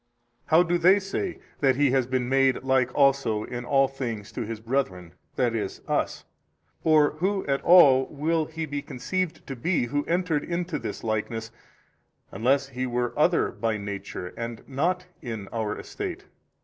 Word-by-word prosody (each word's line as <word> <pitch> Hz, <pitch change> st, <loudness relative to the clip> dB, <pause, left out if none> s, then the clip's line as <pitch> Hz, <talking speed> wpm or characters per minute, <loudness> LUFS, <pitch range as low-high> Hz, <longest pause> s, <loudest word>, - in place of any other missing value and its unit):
A. 120 Hz, 0 st, -37 dB
How 165 Hz, +2 st, +6 dB
do 175 Hz, 0 st, 0 dB
they 185 Hz, +4 st, +6 dB
say 200 Hz, -, -3 dB, 0.2 s
that 135 Hz, -2 st, +3 dB
He 140 Hz, -1 st, +3 dB
has 130 Hz, -2 st, +2 dB
been 130 Hz, -1 st, -1 dB
made 135 Hz, -1 st, +2 dB
like 130 Hz, -2 st, +2 dB
also 135 Hz, -6 st, +3 dB
in 120 Hz, +1 st, -5 dB
all 135 Hz, +1 st, +4 dB
things 120 Hz, -7 st, -5 dB
to -, -, -5 dB
His 110 Hz, 0 st, -5 dB
brethren, 110 Hz, -8 st, -2 dB, 0.2 s
i. 125 Hz, -, +3 dB
e., 115 Hz, -, -1 dB, 0.2 s
us? -, -, -1 dB, 0.6 s
or 155 Hz, -2 st, +5 dB
who 195 Hz, +2 st, 0 dB
at 140 Hz, 0 st, 0 dB
all 135 Hz, -7 st, +7 dB
will 155 Hz, +2 st, 0 dB
He 160 Hz, +1 st, -5 dB
be 145 Hz, -1 st, -4 dB
conceived 170 Hz, +6 st, -3 dB
to 135 Hz, -, -6 dB
be 145 Hz, +2 st, 0 dB
who 145 Hz, +4 st, -1 dB
entered 170 Hz, -3 st, 0 dB
into 170 Hz, -1 st, -3 dB
this -, -, -6 dB
likeness, 110 Hz, +1 st, -2 dB, 0.8 s
unless 135 Hz, +7 st, +1 dB
He 130 Hz, -1 st, -3 dB
were 120 Hz, 0 st, -1 dB
other -, -, +3 dB
by 110 Hz, -1 st, -1 dB
Nature 100 Hz, -3 st, -6 dB
and 115 Hz, -1 st, -6 dB
not 175 Hz, +7 st, -1 dB, 0.2 s
in 110 Hz, -5 st, -6 dB
our 110 Hz, -2 st, -2 dB
estate? -, -, -6 dB
135 Hz, 170 wpm, -26 LUFS, 115-155 Hz, 0.8 s, all